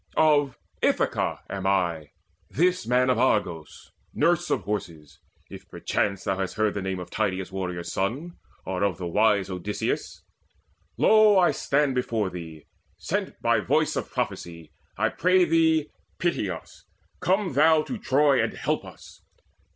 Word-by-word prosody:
Of 145 Hz, -4 st, +3 dB, 0.2 s
Ithaca -, -, 0 dB
am 95 Hz, -1 st, -4 dB
I: 85 Hz, -6 st, 0 dB, 0.4 s
this 180 Hz, -5 st, +1 dB
man 125 Hz, +1 st, +3 dB
Of -, -, 0 dB
Argos, 90 Hz, -10 st, -1 dB, 0.2 s
nurse 175 Hz, +3 st, +2 dB
of -, -, 0 dB
horses 85 Hz, -8 st, -6 dB, 0.3 s
if -, -, -12 dB
perchance 100 Hz, -2 st, -2 dB
Thou 95 Hz, 0 st, -1 dB
hast 95 Hz, -1 st, -3 dB
heard 110 Hz, -1 st, +1 dB
the 100 Hz, -, -3 dB
name 95 Hz, 0 st, -3 dB
of 90 Hz, -, -9 dB
Tydeus' 95 Hz, -3 st, -2 dB
warrior 90 Hz, -2 st, -4 dB
son 130 Hz, -, -3 dB, 0.3 s
Or 95 Hz, -1 st, -3 dB
of 100 Hz, -5 st, 0 dB
the 90 Hz, -, -5 dB
wise 100 Hz, +2 st, +2 dB
Odysseus. 95 Hz, +3 st, -3 dB, 0.7 s
Lo, 215 Hz, -2 st, +5 dB
I 180 Hz, -2 st, +5 dB
stand 140 Hz, -1 st, +1 dB
Before 115 Hz, -6 st, -1 dB
thee, 80 Hz, -3 st, -9 dB, 0.3 s
sent -, -, -3 dB
by -, -, +3 dB
voice -, -, +1 dB
of -, -, -3 dB
prophecy. 85 Hz, -3 st, -5 dB, 0.3 s
I -, -, +2 dB
pray 185 Hz, 0 st, +3 dB
thee, 160 Hz, -2 st, +2 dB, 0.3 s
pity 170 Hz, -, -1 dB
us: 85 Hz, -3 st, -9 dB, 0.4 s
come 190 Hz, -2 st, 0 dB
thou 155 Hz, +2 st, +4 dB
to 240 Hz, +4 st, -6 dB
Troy 140 Hz, -4 st, +3 dB
And -, -, -2 dB
help -, -, -2 dB
us. -, -, -14 dB
105 Hz, 150 wpm, -25 LUFS, 95-155 Hz, 0.7 s, Lo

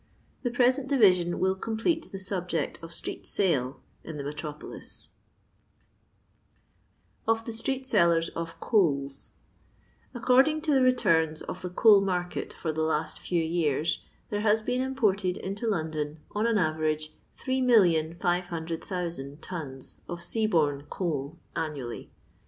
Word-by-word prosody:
The 245 Hz, -, 0 dB
present 255 Hz, +3 st, +2 dB
division 185 Hz, -10 st, +4 dB
will 190 Hz, 0 st, +2 dB
complete 225 Hz, -, -1 dB
the 195 Hz, -, -5 dB
subject 185 Hz, -3 st, 0 dB
of 165 Hz, 0 st, -9 dB
Street 170 Hz, -, -6 dB
Sale 140 Hz, -9 st, +1 dB, 0.2 s
in 160 Hz, -, -7 dB
the 140 Hz, -, -4 dB
metropolis. 150 Hz, +1 st, -5 dB, 2.2 s
Or 225 Hz, -, +5 dB
THi 225 Hz, +1 st, -7 dB
Stbhi 265 Hz, +4 st, -1 dB
Sellsbs 170 Hz, -8 st, +3 dB
or 165 Hz, 0 st, -2 dB
Coals. 140 Hz, -, 0 dB, 0.8 s
AcfCOBDiHo 265 Hz, +6 st, +4 dB
to 310 Hz, -2 st, +2 dB
the 265 Hz, -, +4 dB
returns 165 Hz, -12 st, +3 dB
of -, -, -6 dB
the 180 Hz, -, -4 dB
coal 205 Hz, +2 st, +6 dB
market 180 Hz, -2 st, -2 dB
for 160 Hz, -, -3 dB
the 160 Hz, -, -2 dB
last 155 Hz, 0 st, -1 dB
few 170 Hz, -2 st, 0 dB
years, 160 Hz, -1 st, 0 dB, 0.3 s
there 205 Hz, 0 st, -1 dB
has 215 Hz, 0 st, +3 dB
been 250 Hz, +3 st, 0 dB
imported 205 Hz, -8 st, +1 dB
into 200 Hz, +4 st, -4 dB
London, 155 Hz, -5 st, -2 dB
on 210 Hz, +2 st, 0 dB
an 230 Hz, -2 st, +2 dB
average, 155 Hz, -3 st, 0 dB, 0.2 s
3,500,000 175 Hz, -, 0 dB
tons 145 Hz, -7 st, -5 dB
of 175 Hz, -, -4 dB
sea 220 Hz, +5 st, 0 dB
borne 145 Hz, -6 st, +1 dB
coal 155 Hz, -3 st, -3 dB, 0.2 s
annually. 140 Hz, -7 st, -4 dB
175 Hz, 130 wpm, -28 LUFS, 155-220 Hz, 2.2 s, coal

